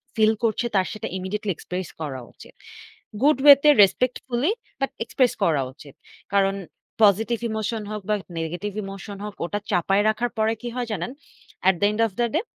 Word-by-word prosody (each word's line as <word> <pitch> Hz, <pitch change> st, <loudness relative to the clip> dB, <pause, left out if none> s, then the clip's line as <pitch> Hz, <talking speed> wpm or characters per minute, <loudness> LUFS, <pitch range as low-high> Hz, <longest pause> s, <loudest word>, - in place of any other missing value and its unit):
feel 220 Hz, 0 st, +4 dB
করছে 230 Hz, +1 st, +1 dB
তার 190 Hz, -1 st, +3 dB
সেটা 215 Hz, -, -5 dB
imidiateltly 200 Hz, +2 st, -3 dB
express 180 Hz, -1 st, -5 dB
করা 135 Hz, -4 st, -4 dB
উচিত। -, -, -15 dB, 0.7 s
Good 295 Hz, -2 st, +5 dB
way 285 Hz, -1 st, +12 dB
তে 300 Hz, -, +7 dB
respectfully 250 Hz, -, 0 dB, 0.3 s
বাট 270 Hz, -, -1 dB
express 250 Hz, +1 st, +1 dB
করা 155 Hz, -6 st, +2 dB
উচিত। 140 Hz, 0 st, -14 dB, 0.4 s
কারণ 195 Hz, -1 st, +3 dB, 0.5 s
positive 220 Hz, +3 st, +4 dB
emotion 220 Hz, +1 st, -2 dB
হোক 210 Hz, -1 st, -4 dB
বা 210 Hz, -, +3 dB, 0.2 s
negetive 175 Hz, +5 st, -4 dB
emotion 195 Hz, +1 st, -8 dB
হোক 210 Hz, -, -5 dB
ওটা 205 Hz, +4 st, -3 dB
চাপায় 195 Hz, +4 st, +2 dB
রাখার 235 Hz, +3 st, 0 dB
পরে 220 Hz, +1 st, +2 dB
কি 245 Hz, -, -5 dB
হয় 245 Hz, -2 st, -2 dB
জানেন? 200 Hz, +4 st, -3 dB, 0.6 s
At 190 Hz, -, +3 dB
the -, -, +5 dB
end 210 Hz, -, -5 dB
of -, -, -12 dB
the 240 Hz, -, +3 dB
day 355 Hz, -, +1 dB
210 Hz, 175 wpm, -24 LUFS, 195-235 Hz, 0.7 s, way